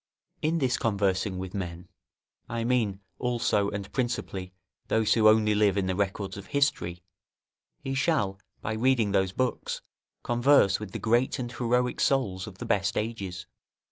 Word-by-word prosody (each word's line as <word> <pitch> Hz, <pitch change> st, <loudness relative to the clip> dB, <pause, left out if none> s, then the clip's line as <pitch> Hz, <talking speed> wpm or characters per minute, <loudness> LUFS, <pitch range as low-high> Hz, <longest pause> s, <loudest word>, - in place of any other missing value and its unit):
In 160 Hz, +2 st, +1 dB
this 130 Hz, -5 st, +1 dB
conversing 100 Hz, -3 st, 0 dB
with 95 Hz, 0 st, -5 dB
men, 90 Hz, -3 st, -5 dB, 0.6 s
I 115 Hz, 0 st, -2 dB
mean 115 Hz, -5 st, +1 dB, 0.2 s
also, 115 Hz, -5 st, +1 dB
and 100 Hz, -1 st, -6 dB
principally, 110 Hz, -7 st, -2 dB, 0.4 s
those 110 Hz, -1 st, +3 dB
who 110 Hz, -2 st, +5 dB
only 110 Hz, -1 st, +4 dB
live 105 Hz, -2 st, +3 dB
in 100 Hz, -, +1 dB
the 95 Hz, -, 0 dB
records 100 Hz, 0 st, -2 dB
of 100 Hz, -, -9 dB
history; 90 Hz, -12 st, 0 dB, 0.8 s
he 135 Hz, -, -2 dB
shall, 135 Hz, -, +1 dB, 0.2 s
by 110 Hz, -, -2 dB
reading 115 Hz, -2 st, +2 dB
those 95 Hz, -2 st, +2 dB
books, 130 Hz, +5 st, -2 dB, 0.4 s
converse 120 Hz, -4 st, +4 dB
with 105 Hz, -2 st, -6 dB
the -, -, -5 dB
great 120 Hz, +3 st, +2 dB
and 120 Hz, -2 st, -4 dB
heroic 125 Hz, 0 st, 0 dB
souls 100 Hz, -9 st, +1 dB
of 95 Hz, -3 st, -10 dB
the -, -, -6 dB
best 100 Hz, -2 st, +1 dB
ages. 100 Hz, -6 st, -3 dB
105 Hz, 155 wpm, -28 LUFS, 95-120 Hz, 0.8 s, who